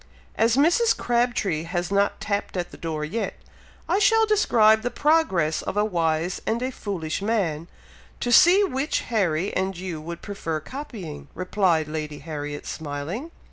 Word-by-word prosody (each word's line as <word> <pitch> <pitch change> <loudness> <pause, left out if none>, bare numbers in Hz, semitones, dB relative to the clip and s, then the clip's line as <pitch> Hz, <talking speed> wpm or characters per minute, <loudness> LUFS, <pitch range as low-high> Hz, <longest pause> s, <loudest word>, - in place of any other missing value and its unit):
"As 225 +2 +3
Mrs. 345 +11 +4
Crabtree 235 -9 0
has 175 +1 -3
not 200 0 +1
tapped 200 -2 -2
at 175 -1 -3
the - - -11
door 155 -2 -3
yet, 225 +9 -3 0.5
I 360 +5 +2
shall 450 +1 +5
describe 220 - +4
the 245 - -1
progress 245 - +2
of 200 - -4
a 210 - +3
wise 170 -2 0
and 225 - +1
a 260 - -1
foolish 185 -9 -4
man, 185 -7 -1 0.5
to 245 - -1
see 360 - +7
which 290 -5 -1
Harry 190 -5 0
and 190 0 -1
you 175 -4 -5
would 170 +2 -7
prefer 165 -6 -3
copying," 205 - -8
replied 185 -3 +1
Lady 150 -1 -4
Harriet, 145 -2 -6
smiling. 160 - -5
195 Hz, 155 wpm, -24 LUFS, 160-240 Hz, 0.5 s, see